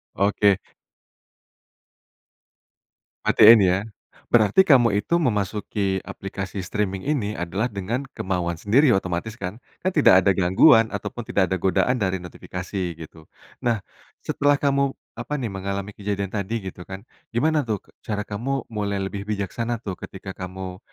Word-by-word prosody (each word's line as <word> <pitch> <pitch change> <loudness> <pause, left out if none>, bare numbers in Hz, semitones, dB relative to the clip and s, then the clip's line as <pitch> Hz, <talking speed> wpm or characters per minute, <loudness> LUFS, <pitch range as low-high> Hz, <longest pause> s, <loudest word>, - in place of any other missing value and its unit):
Oke. 100 0 +3 2.7
Matiin 110 +1 +8
ya, 95 0 +2 0.5
berarti 120 - +5
kamu 125 - +5
itu 170 - +1
memasuki 105 - -1
aplikasi 95 0 -6
streaming 95 0 -2
ini 120 -8 -1
adalah 90 +7 -2
dengan 115 +5 -4
kemauan 90 -2 -2
sendiri 120 - +3
otomatis 95 +3 -2
kan, 100 0 -6 0.2
kan 185 - +1
tidak 140 - +6
ada 100 - +4
gangguan 100 - +5
ataupun 120 +1 -6
tidak 95 -2 +1
ada 95 - 0
godaan 125 +8 +1
dari 95 -3 0
notifikasi, 90 0 -5
gitu. 80 -1 -12 0.3
Nah, 115 -4 0 0.4
setelah 145 0 +2
kamu, 140 -1 +1 0.2
apa 150 - -3
nih, 125 -7 -3
mengalami 100 +1 -4
kejadian 100 -1 -3
tadi 105 +1 -3
gitu 90 - -13
kan, 95 +1 -8 0.3
gimana 155 +6 +2
tuh, 105 -3 -2 0.2
cara 105 -1 -3
kamu 125 +7 -3
mulai 100 -2 -2
lebih 100 +1 -5
bijaksana 110 +3 -3
tuh, 95 -3 -5
ketika 95 - -8
kamu, 95 0 -7
100 Hz, 135 wpm, -23 LUFS, 95-115 Hz, 2.7 s, Matiin